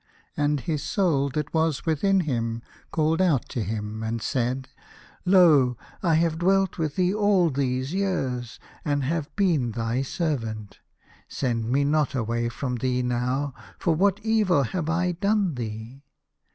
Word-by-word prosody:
And 145 -1 +1
his 150 +3 -2
Soul 150 -5 +1
that 150 -1 -2
was 160 -6 +1
within 190 +5 +2
him 115 -6 -2 0.3
called 160 +2 +1
out 160 -9 +2
to 120 - -3
him 105 +1 -4
and 110 +1 -2
said, 130 +1 -1 0.3
" - - -21 0.3
Lo! 155 -10 +5 0.2
I 165 -3 +3
have 165 0 +1
dwelt 190 +1 +2
with 155 -3 -1
thee 180 0 +2
for 205 - -2
all 200 -5 +4
these 130 +1 -1
years, 130 - -2 0.3
and 145 -2 0
have 155 +2 -1
been 160 - +1
thy 115 +2 -1
servant. 115 - -3 0.5
Send 115 -4 -2
me 140 +3 +2
not 150 -1 +1
away 120 0 -1
from 125 +1 -3
thee 125 +1 0
now, 125 +3 -1 0.2
for 170 - +1
what 195 +4 +2
evil 210 -9 +3
have 160 +5 -3
I 175 +2 +1
done 200 0 +1
thee 115 +2 -6
145 Hz, 155 wpm, -25 LUFS, 125-170 Hz, 0.5 s, Lo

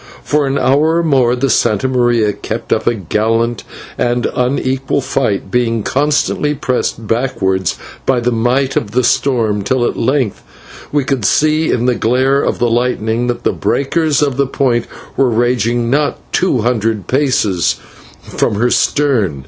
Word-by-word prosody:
For 150 -1 +1
an 135 +1 0
hour 150 +5 +2
or 170 - +1
more 130 -6 +2
the 125 +2 -1
/Santa 110 -2 +1
Maria/ 120 -4 +1
kept - - -3
up - - -2
a 120 - +2
gallant 115 +4 -1 0.4
and 120 0 0
unequal 130 +2 0
fight, 105 -7 -2
being 115 -2 0
constantly 150 +2 0
pressed 125 -4 -2
backwards 95 -6 -1 0.3
by 130 -2 +1
the 120 +1 0
might 125 +4 0
of 105 -2 -2
the 125 +1 +2
storm, 115 -6 +1
till 125 +4 0
at - - -1
length 130 -3 0 0.5
we 145 -1 +1
could 130 -3 -2
see 155 +8 +2
in 120 - 0
the 125 - +3
glare 130 +4 +1
of - - -1
the 120 - +1
lightning 120 -1 0
that 120 -1 -3
the - - +1
breakers 150 +1 0
of 140 -3 -1
the 140 -1 +1
Point 125 -4 0 0.3
were 135 -2 +2
raging 120 0 0
not 145 +1 +1 0.2
two 175 -10 +1
hundred 110 -3 -1
paces 125 - +1 0.5
from - - -1
her 120 +4 +1
stern. 120 - +1
125 Hz, 160 wpm, -15 LUFS, 115-135 Hz, 0.5 s, the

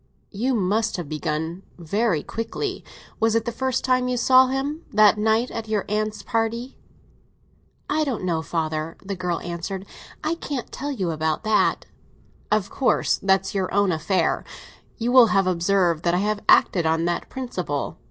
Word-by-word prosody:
"You 245 +5 0
must 215 +2 0
have 175 -4 -5
begun 155 +3 -3 0.2
very 175 0 0
quickly. 370 - -4 0.4
Was 225 0 +2
it 225 -1 +1
the 235 - -2
first 260 +1 -1
time 255 -1 +2
you 250 0 0
saw 255 +2 +6
him—that 265 -6 +2
night 220 +3 +2
at 225 -1 -5
your 215 -2 -1
aunt's 215 +1 -2
party?" 230 +2 -2 1.1
"I 310 +1 +1
don't 255 -10 -3
know, 170 -3 0
father," 160 -1 -3
the 200 0 -3
girl 180 -2 -2
answered. 175 +3 -5 0.4
"I 310 +1 0
can't 285 -6 -5
tell 290 +1 -4
you 190 -10 -2
about 155 +2 -1
that." 215 -1 +2 0.7
"Of 210 -2 +1
course; 270 - +1
that's 190 -1 +2
your 190 -2 -1
own 200 -1 +2
affair. 165 +2 0 0.5
You 235 +1 -1
will 250 -2 +8
have 195 -3 +2
observed 175 -2 +2
that 170 0 +3
I 190 +3 +1
have 210 -1 -1
acted 170 -4 +5
on 165 +1 +1
that 175 0 -2
principle. 180 - -4
205 Hz, 160 wpm, -23 LUFS, 175-240 Hz, 1.1 s, will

